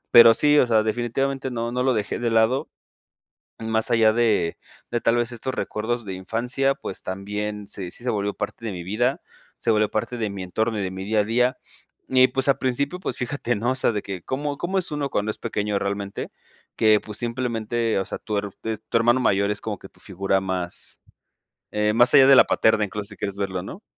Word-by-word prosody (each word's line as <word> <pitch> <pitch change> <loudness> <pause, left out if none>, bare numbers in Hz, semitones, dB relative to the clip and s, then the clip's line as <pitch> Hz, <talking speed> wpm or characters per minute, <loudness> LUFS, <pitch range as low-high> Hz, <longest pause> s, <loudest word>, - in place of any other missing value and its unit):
Pero 115 -1 +9
sí, 150 +2 +4
o - - +5
sea, 110 -2 +3
definitivamente 130 +4 -1
no 115 0 -2
no 125 0 0
lo 130 - +3
dejé 105 -2 -2
de 120 -1 -1
lado, 115 +4 +2 0.9
más 110 +1 0
allá 110 -1 +5
de 110 -8 +2 0.3
de 120 - -1
tal 115 - +2
vez 120 0 0
estos 120 +2 -4
recuerdos 120 +2 -2
de 95 -2 -5
infancia, 125 +8 0
pues, 95 - -7
también 105 +2 -4
se 90 -3 -4
sí - - -7
se 125 - -1
volvió 105 -2 -1
parte 105 +2 -5
de 110 - -3
mi 90 -1 -6
vida, 120 +9 0 0.4
se 115 - +1
volvió 105 -1 +3
parte 110 +3 -2
de 110 -3 -1
mi 100 -1 -6
entorno, 110 +4 -1
y - - -1
de 95 - -2
mi 95 0 -6
día 105 +1 +1
a - - +2
día, 125 +3 +1 0.5
y 130 0 +6
pues 135 +1 -1
al 135 - +3
principio, 140 +6 -1
pues, - - -3
fíjate 125 -1 -2
¿no? 120 +4 0
O - - -2
sea, 125 - +2
de 105 - -2
que, 95 -4 -6
cómo 145 +2 -3
cómo 190 +2 -1
es 180 - -2
uno 145 -2 -2
cuando 105 +1 -1
es - - -4
pequeño 105 -3 -1
realmente 100 0 -4 0.5
que, 110 -1 +5
pues 105 -1 -8
simplemente, 115 -2 -1
o 95 - -2
sea, - - -6
tu 105 -2 -4
her 100 0 -2
tes 110 -1 -4
tu - - 0
hermano 120 +3 +4
mayor 100 -3 +2
es 105 - -6
como 105 -4 -4
que 95 - -12
tu - - -19
figura 95 0 -1
más, 90 -2 -2 0.7
eh, 105 0 +1
más 120 +2 +5
allá 135 -2 +8
de 135 - +8
la - - +9
paterna, 110 -1 +3
incluso 100 +1 -6
si - - -11
quieres 100 0 -4
verlo, 95 -2 -2
¿no? 190 - -9
110 Hz, 225 wpm, -24 LUFS, 100-125 Hz, 0.9 s, Pero